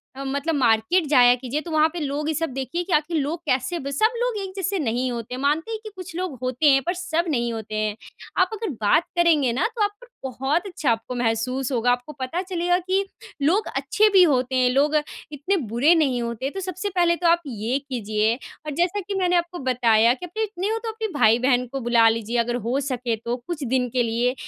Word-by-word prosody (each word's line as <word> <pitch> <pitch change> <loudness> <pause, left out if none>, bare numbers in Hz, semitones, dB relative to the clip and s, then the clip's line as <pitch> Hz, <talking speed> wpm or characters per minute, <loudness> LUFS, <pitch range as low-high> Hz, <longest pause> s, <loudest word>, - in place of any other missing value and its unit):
अ, 275 - -6
मतलब 280 +4 -1
मार्केट 245 +7 +2
जाया 245 -4 +6
कीजिए, 255 +4 -4
तो 340 - -8
वहाँ 310 0 +4
पे 350 - -4
लोग 290 +1 -2
ये - - 0
सब 325 0 -1
देखिए 270 +7 -3
कि 355 0 -4
आखिर 310 +2 +1
लोग 305 +3 -2
कैसे 300 +7 0
ब 275 +1 -5
सब 435 - +2
लोग 485 -3 0
एक 380 - -6
जैसे 390 0 -1
नहीं 250 -2 -1
होते 235 0 -5
हैं, 255 - -6
मानते 305 +9 0
हैं 440 - -3
कि 430 - -7
कुछ 370 -1 -9
लोग 355 -7 -3
होते 255 +4 +1
हैं, 270 0 +4
पर 355 - +1
सब 345 -1 -1
नहीं 240 -5 0
होते 220 -1 -6
हैं। 215 -1 -1 0.5
आप - - +3
अगर 440 -1 -3
बात 260 +11 +4
करेंगे 315 -7 +3
ना, 260 - 0
तो 440 - +1
आप 410 - +1
पर - - -14 0.2
बहुत 270 - -1
अच्छा 315 -9 -1
आपको 230 +2 -3
महसूस 245 +3 -1
होगा। 245 -1 +2
आपको 245 +5 -2
पता 260 +7 -2
चलेगा 355 -1 0
कि 375 +2 0 0.4
लोग 365 +9 +2
अच्छे 430 +1 +3
भी 380 - +7
होते 260 -4 +2
हैं, 255 -1 +3
लोग 290 +4 +2 0.4
इतने 300 +7 -1
बुरे 265 +9 +4
नहीं 270 -7 +1
होते। 235 +3 -3
तो 385 - -6
सबसे 370 +2 -4
पहले 350 -3 +2
तो 345 0 0
आप 340 +1 +4
ये 235 +2 -2
कीजिए, 225 -5 -1 0.3
और 305 - -4
जैसा 350 +5 +1
कि 395 +1 -5
मैंने 360 -1 +2
आपको 345 0 -1
बताया 235 -3 +3
कि 360 - -8
अपने 435 +6 -3
इतने 400 -2 -3
हो 450 - 0
तो 455 - -3
अपने 445 0 -4
भाई-बहन 245 +3 +4
को 270 - -2
बुला 235 -1 +4
लीजिए 230 +1 -2
अगर 240 +1 0
हो 255 +3 +1
सके 250 -4 -2
तो 235 +1 -1
कुछ 335 -4 -4
दिन 250 0 0
के 245 +1 +1
लिए, 235 +2 0
280 Hz, 230 wpm, -23 LUFS, 245-350 Hz, 0.5 s, भी